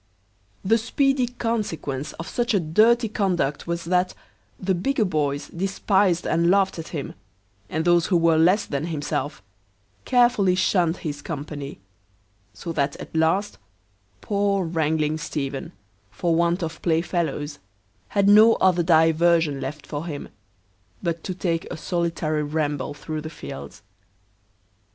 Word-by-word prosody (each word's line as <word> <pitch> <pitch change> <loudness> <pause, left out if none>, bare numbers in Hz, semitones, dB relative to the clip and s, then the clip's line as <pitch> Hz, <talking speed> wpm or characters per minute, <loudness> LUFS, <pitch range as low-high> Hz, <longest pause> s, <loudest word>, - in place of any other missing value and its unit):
The 225 +4 +4
speedy 270 +2 +1
consequence 205 - -3
of 165 - -8
such 240 -3 0
a - - +4
dirty 220 +9 +3
conduct 180 -9 -1
was, 170 0 -2
that 180 +1 +1 0.4
the 190 0 0
bigger 215 +6 0
boys 145 -5 -1
despised 190 0 +1
and 170 +1 +2
laughed 195 -2 +2
at 165 - -6
him, 150 -5 -5 0.6
and 160 +1 -2
those 175 -1 +4
who 180 - +3
were 165 -1 +3
less 185 +6 +4
than 140 +1 -3
himself, 145 - -3 0.6
carefully 240 -7 +3
shunned 180 -2 +2
his 145 -2 -3
company; 145 -2 -6 0.7
so 105 - -7
that 140 -3 0
at - - -10
last 165 +6 +1 0.6
poor 200 -2 0
wrangling 155 -1 0
Stephen, 140 -3 -4 0.4
for 170 - -1
want 170 +2 +1
of 165 0 -5
play 165 -2 +2
fellows, 160 -4 -2 0.5
had 200 -1 +1
no 215 +3 +8
other 180 -2 +3
diversion 165 -3 +3
left 140 +2 -6
for 150 +3 -5
him, 145 -4 -6 0.7
but 170 -1 -2
to 185 - -4
take 170 -3 -2
a - - -4
solitary 165 -2 -1
ramble 145 -2 -2
through 155 +1 -5
the 155 - -6
fields. 95 - -9
170 Hz, 135 wpm, -24 LUFS, 155-190 Hz, 0.7 s, no